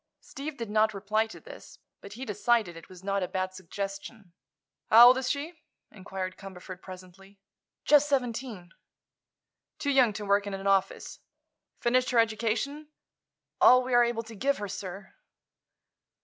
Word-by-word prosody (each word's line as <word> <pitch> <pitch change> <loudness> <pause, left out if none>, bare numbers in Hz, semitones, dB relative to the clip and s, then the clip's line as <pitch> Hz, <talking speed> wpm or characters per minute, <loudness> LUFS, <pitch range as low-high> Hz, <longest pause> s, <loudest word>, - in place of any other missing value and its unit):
Steve 285 +1 -8
did 230 -3 -6
not 215 0 +2
reply 215 +3 0
to 220 - -12
this, - - -13 0.2
but 200 - -11
he 255 +5 -7
decided 210 -3 0
it 165 - -13
was 185 -1 -14
not 200 0 -1
a 180 - -1
bad 185 0 -3
suggestion. 195 +1 -7 0.6
"How 230 +2 +9
old 255 - +4
is 260 - -3
she?" 310 +3 -4 0.3
inquired 185 -2 -6
Cumberford, 185 -1 -10
presently. 190 +1 -13 0.5
"Just 295 0 +5
seventeen." 235 -8 -3 1.1
"Too 285 - -1
young 260 -5 +4
to 210 0 -6
work 200 0 +2
in 200 - -4
an 195 0 -8
office. 195 -1 0 0.6
Finished 255 +2 +2
her 250 - 0
education?" 230 +7 0 0.7
"All 255 0 +7
we 255 0 -4
are 240 0 +6
able 235 -1 -1
to 225 0 -12
give 275 +6 0
her, 205 - -5
sir." 195 0 -8
215 Hz, 155 wpm, -28 LUFS, 195-245 Hz, 1.1 s, How